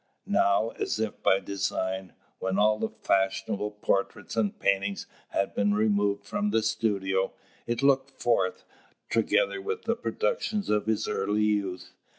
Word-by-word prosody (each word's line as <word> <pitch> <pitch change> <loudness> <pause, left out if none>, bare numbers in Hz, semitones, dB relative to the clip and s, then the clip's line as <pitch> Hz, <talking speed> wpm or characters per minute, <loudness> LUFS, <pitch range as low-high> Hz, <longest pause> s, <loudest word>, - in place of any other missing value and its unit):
Now, 100 +3 +3
as - - -1
if 110 -2 -3
by 95 - +4
design, 95 -1 -2 0.3
when 95 0 -1
all 105 +1 +4
the 110 - -1
fashionable 100 0 0
portraits 105 0 -2
and 110 -3 0
paintings 100 0 0 0.2
had 100 - -1
been 100 0 +2
removed 100 -1 +1
from 105 0 -1
the 110 +1 +2
studio, 100 -4 0 0.3
it 120 +3 -1
looked 135 -1 +4
forth, 115 -8 0 0.5
together - - +2
with 440 +3 -3
the - - +1
productions 450 - -1
of 105 0 +1
his 110 -1 +1
early 105 +2 0
youth. 100 -4 -1
105 Hz, 145 wpm, -28 LUFS, 100-110 Hz, 0.5 s, by